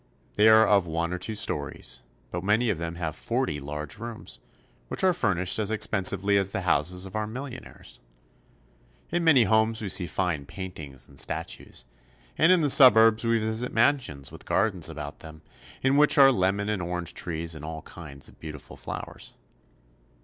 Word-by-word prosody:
They 105 +1 +4
are 110 0 +7
of 100 -4 +3
one 85 +2 -2
or 90 - -4
two 110 +4 -4
stories, 105 - -3 0.3
but 85 0 -4
many 110 +4 +2
of 85 - -4
them 85 0 -5
have 80 -3 -4
forty 120 - -2
large 75 +5 -7
rooms, 115 0 -9 0.5
which - - -2
are 185 -1 +4
fur 100 - 0
nished 90 +4 +1
as 105 -2 -1
expensively 100 -2 +2
as 95 -1 +1
the 95 - -3
houses 90 +1 0
of 95 +2 -10
our 110 0 -2
millionaires. 125 +3 -9 1.1
In 175 +1 0
many 145 -7 +6
homes 110 +2 +2
we 105 - -3
see 90 -1 +1
fine 85 -8 -2
paintings 80 -8 -8
and 70 -1 -5
statues, - - -4 0.5
and 165 +3 +4
in 185 -2 +4
the 150 - +2
suburbs 115 -4 +7
we 115 0 +2
visit 110 +2 -2
mansions 115 - +1
with - - -12
gardens 95 -6 +1
about 75 -2 -8
them, 80 -1 -13 0.4
in 135 +1 +3
which 150 +1 +5
are 135 -1 +8
lemon 100 -1 0
and 105 -3 -2
orange 90 -1 -4
trees 85 -1 -3
and 75 -1 -9
all 80 0 -7
kinds 70 -6 -8
of - - -15
beautiful 75 -3 -10
flowers. - - -8
95 Hz, 180 wpm, -26 LUFS, 85-110 Hz, 1.1 s, are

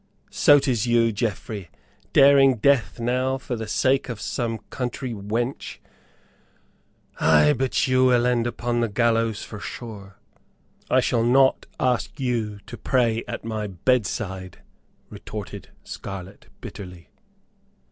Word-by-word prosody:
"So 145 - +6
'tis 125 -5 0
you, 115 -1 +3
Geoffrey, 105 -3 -4 0.4
daring 135 -1 +6
death 125 +2 +2
now 130 +3 0
for 130 -2 -5
the 110 -1 -5
sake 130 +4 +1
of 115 -4 -5
some 115 +1 -2
country 125 0 -4
wench? 115 +5 -3 1.4
Ay, 75 -1 +5
but 130 +1 0
you 130 0 +3
will 125 -1 +4
end 120 -1 +1
upon 120 0 -2
the 115 -1 0
gallows, 115 0 +1
for 105 - -8
sure." 100 -2 -9 0.7
"I - - +4
shall 115 - +1
not 130 +3 +3
ask 125 +3 -1
you 115 -5 -1
to - - -9
pray 115 -3 +1
at - - -6
my 110 -2 -3
bedside," 95 -2 -2 0.5
retorted - - -8
Scarlett, 95 0 -8
bitterly. 90 -3 -10
115 Hz, 125 wpm, -24 LUFS, 105-125 Hz, 1.4 s, So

